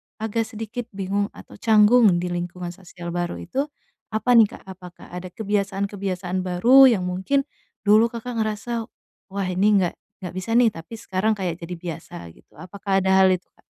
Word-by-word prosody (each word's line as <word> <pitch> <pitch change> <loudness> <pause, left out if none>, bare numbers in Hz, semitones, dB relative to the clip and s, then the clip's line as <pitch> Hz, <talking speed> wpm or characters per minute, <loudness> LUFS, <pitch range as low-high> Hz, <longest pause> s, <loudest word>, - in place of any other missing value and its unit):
agak 225 +1 -2
sedikit 225 +1 -6
bingung 200 +1 -1
atau - - -13
canggung 220 +1 +6 0.2
di 180 - -3
lingkungan 175 0 -4
sosial 175 -1 -9
baru 175 0 -2
itu 270 +11 -3 0.5
apa 245 +3 +1
nih, 230 -3 +7
Kak? - - -15
Apakah 185 -2 -12
ada 180 +1 -6
kebiasaan-kebiasaan 195 -2 -2
baru 230 +10 +6
yang 215 -7 +2
mungkin 190 +10 0 0.4
dulu 215 +2 +5
Kakak 235 0 -5
ngerasa, 220 +1 -2 0.4
"Wah 195 -1 -3
ini 185 +3 +2
enggak 175 - 0 0.3
enggak 180 - -5
bisa 205 +5 -6
nih, 240 -1 +6
tapi 165 +4 -11
sekarang 215 0 -1
kayak 180 -4 -3
jadi 175 +1 -6
biasa," 165 -2 -8 0.2
gitu. - - -24
Apakah 195 +1 -2
ada 190 - +2
hal 190 - +7
itu, 180 0 -3
Kak? - - -30
195 Hz, 170 wpm, -23 LUFS, 180-220 Hz, 0.5 s, nih